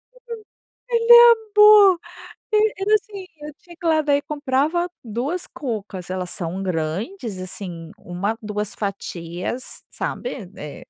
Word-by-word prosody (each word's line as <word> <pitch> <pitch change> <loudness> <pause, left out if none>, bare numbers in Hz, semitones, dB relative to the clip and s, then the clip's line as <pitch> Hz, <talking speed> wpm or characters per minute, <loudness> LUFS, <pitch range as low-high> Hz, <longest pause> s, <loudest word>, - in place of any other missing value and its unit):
Hum, - - -19 0.7
ele 470 0 +5 0.4
amou, 420 -4 +8 0.5
eh, 430 0 +3
era 415 +2 +2
assim, 405 -2 -4 0.2
eu 300 0 -8
tinha 345 -1 -15
que 345 - -9
ir - - +3
lá, 315 -1 +3
daí 285 -1 +1
comprava 295 +4 -1 0.2
2 255 - -3
cucas, 210 - -6
elas 185 -1 -3
são 175 +2 -4
grandes, 190 - -3
assim, 180 -3 -7
1, 195 +5 -4
2 210 -1 -4
fatias, 190 +2 -5
sabe, 245 - -5
é 150 - -9
245 Hz, 130 wpm, -22 LUFS, -, 0.7 s, amou